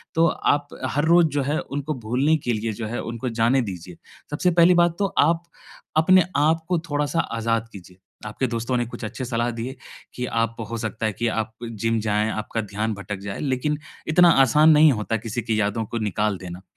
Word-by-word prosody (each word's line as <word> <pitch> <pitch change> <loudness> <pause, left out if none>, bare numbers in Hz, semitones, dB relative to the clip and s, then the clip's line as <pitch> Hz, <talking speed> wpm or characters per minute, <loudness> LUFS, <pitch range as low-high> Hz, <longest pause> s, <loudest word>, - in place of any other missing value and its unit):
तो 165 +1 +4
आप 145 0 0 0.3
हर 145 +2 +2
रोज़ 170 0 +5
जो - - +2
है, 145 +3 -1
उनको 145 +2 -4
भूलने 140 +7 +2
के 120 - +1
लिए 110 +1 -2
जो 110 +1 -5
है, 120 +2 -4
उनको 115 +2 -4
जाने 130 +3 +4
दीजिए। 90 -5 -7 0.3
सबसे 180 +5 +1
पहली 170 +1 +5
बात 170 -1 +1
तो 200 - +2 0.2
आप 170 0 0 0.5
अपने 185 +3 +6
आपको 160 +3 +1
थोड़ा-सा 145 +3 0 0.2
आज़ाद 115 0 -1
कीजिए। 90 -1 -13 0.3
आपके 125 +5 -2
दोस्तों 120 +2 -2
ने 120 - 0
कुछ 120 - -9
अच्छे 130 +4 -5
सलाह 120 0 -1
दिए 120 +3 -5 0.4
कि 125 - -3
आप, 115 -1 -1 0.2
हो 115 - -2
सकता 110 0 -3
है 110 - -2
कि 120 +4 -2
आप 110 -1 -2 0.2
जिम 115 +1 -1
जाएँ, 105 0 0
आपका 110 +1 -3
ध्यान 105 +2 -3
भटक 100 0 -6
जाए, 100 - -5
लेकिन 145 +2 -1 0.3
इतना 175 +3 +6
आसान 150 +5 +5
नहीं 150 0 +7
होता 110 +1 -2
किसी 115 +1 -4
की 110 -2 0
यादों 105 +2 -1
को 115 - -5
निकाल 105 -1 -1
देना, 90 0 -8
115 Hz, 200 wpm, -23 LUFS, 110-150 Hz, 0.5 s, नहीं